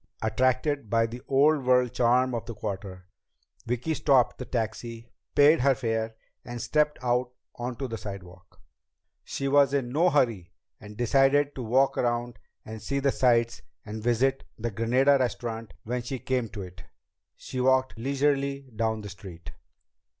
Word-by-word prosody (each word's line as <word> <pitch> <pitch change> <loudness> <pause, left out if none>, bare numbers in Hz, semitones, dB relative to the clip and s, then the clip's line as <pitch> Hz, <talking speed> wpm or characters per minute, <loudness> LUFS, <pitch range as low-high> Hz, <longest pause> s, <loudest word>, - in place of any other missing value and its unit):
Attracted 130 +3 +1
by 115 +1 +3
the 120 +2 -7
old 145 +1 +3
world 125 -1 +3
charm 125 +1 +3
of 115 - -4
the 115 - -6
Quarter, 95 -3 -6 0.6
Vicki 125 +7 -1
stopped 135 -5 +2
the 125 - -5
taxi, 115 0 -4 0.2
paid 145 +3 +6
her 135 0 +4
fare, 115 -2 -2 0.3
and 120 0 -7
stepped 150 +5 +1
out 125 0 +1 0.2
onto 125 +2 -4
the 115 -2 -5
sidewalk. 90 -2 -10 0.6
She 140 - -4
was 140 0 +4
in 125 -3 -1
no 165 +6 +3
hurry 115 - 0 0.3
and 105 0 -12
decided 135 +4 +3
to 130 - -6
walk 130 +4 +2
around 120 0 -1 0.3
and 110 0 -8
see 140 +6 -2
the 140 0 +2
sights 120 -3 +2 0.2
and 110 +1 -6
visit 120 +4 +1
the 115 +1 -3
Granada 125 +6 +3
Restaurant 115 -3 -3
when 125 +2 -2
she 125 +2 -4
came 125 -1 -2
to 100 - -7
it! 90 -2 -11 0.5
She 130 - -5
walked 130 0 +2
leisurely 140 +1 -1
down 110 0 -1
the 105 - -8
street. 95 -3 -10
120 Hz, 155 wpm, -27 LUFS, 115-135 Hz, 0.6 s, paid